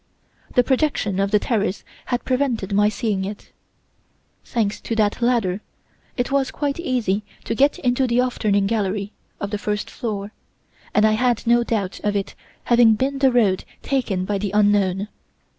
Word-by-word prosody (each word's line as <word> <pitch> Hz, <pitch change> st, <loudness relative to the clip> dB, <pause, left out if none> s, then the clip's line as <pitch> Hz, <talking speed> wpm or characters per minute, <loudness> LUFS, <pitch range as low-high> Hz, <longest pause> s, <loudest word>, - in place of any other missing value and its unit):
The 250 Hz, -, +5 dB
projection 260 Hz, -8 st, 0 dB
of 195 Hz, 0 st, +1 dB
the 210 Hz, -, +4 dB
terrace 205 Hz, -3 st, -1 dB, 0.2 s
had 245 Hz, -1 st, -2 dB
prevented 250 Hz, -7 st, 0 dB
my 205 Hz, +1 st, +4 dB
seeing 210 Hz, -3 st, -1 dB
it. 200 Hz, +2 st, -7 dB, 0.9 s
Thanks 215 Hz, -4 st, -1 dB
to 230 Hz, -, -3 dB
that 215 Hz, +1 st, +1 dB
ladder, 225 Hz, -6 st, +1 dB, 0.6 s
it 245 Hz, +1 st, -1 dB
was 275 Hz, -1 st, +2 dB
quite 285 Hz, +1 st, -2 dB
easy 235 Hz, -, 0 dB, 0.2 s
to -, -, -2 dB
get 280 Hz, +5 st, +3 dB
into 250 Hz, +1 st, +1 dB
the 240 Hz, 0 st, +2 dB
'off 250 Hz, 0 st, 0 dB
turning' 200 Hz, -2 st, +2 dB
gallery 205 Hz, -1 st, -1 dB, 0.3 s
of 200 Hz, -, -4 dB
the 210 Hz, -, -2 dB
first 210 Hz, 0 st, -3 dB
floor, 210 Hz, -4 st, -4 dB, 0.6 s
and 210 Hz, -, +5 dB
I 215 Hz, -, +4 dB
had 240 Hz, +2 st, +1 dB
no 240 Hz, +1 st, +4 dB
doubt 205 Hz, -5 st, -2 dB
of 205 Hz, 0 st, -1 dB
it 200 Hz, -1 st, -2 dB, 0.3 s
having 235 Hz, -2 st, +5 dB
been 270 Hz, +4 st, -1 dB
the 270 Hz, -1 st, +4 dB
road 210 Hz, -7 st, +2 dB, 0.2 s
taken 230 Hz, -10 st, -1 dB
by 200 Hz, 0 st, -1 dB
the 205 Hz, 0 st, -2 dB
unknown. 205 Hz, -2 st, +2 dB
215 Hz, 170 wpm, -22 LUFS, 200-245 Hz, 0.9 s, The